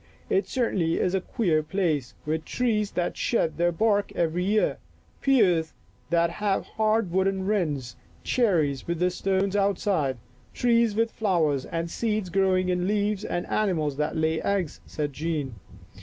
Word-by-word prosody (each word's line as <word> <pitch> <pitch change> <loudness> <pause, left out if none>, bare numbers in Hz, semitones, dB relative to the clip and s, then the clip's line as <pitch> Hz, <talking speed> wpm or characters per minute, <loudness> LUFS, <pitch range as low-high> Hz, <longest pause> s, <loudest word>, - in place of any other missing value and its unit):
" - - -30
It - - -6
certainly 190 -10 0
is 180 - +1
a 190 - +1
queer 175 -8 +1
place, 155 -6 -1
with 155 +1 -1
trees 215 -4 0
that 175 - -1
shed 165 -9 0
their 175 +1 +2
bark 205 +3 +1
every 170 +1 0
year, 200 -8 +1 0.4
pears 180 -12 +3 0.4
that 170 0 +2
have 200 +2 -1
hard 220 -3 0
wooden 190 +1 +1
rinds, 150 - -1 0.3
cherries 165 - +1
with 170 0 -1
the 180 +2 +1
stones 195 +1 0
outside, 195 - +1 0.4
trees 235 -3 +3
with 225 +1 +1
flowers 160 -10 +1
and 165 0 -3
seeds 215 -4 -1
growing 185 -1 +2
in 180 0 +1
the 180 - -1
leaves 205 0 0
and 175 -4 -2
animals 160 -9 0
that 150 0 -1
lay 160 0 +1
eggs," 195 -6 -1
said 145 -2 -3
Jean. 150 -3 -3
185 Hz, 155 wpm, -26 LUFS, 160-205 Hz, 0.4 s, pears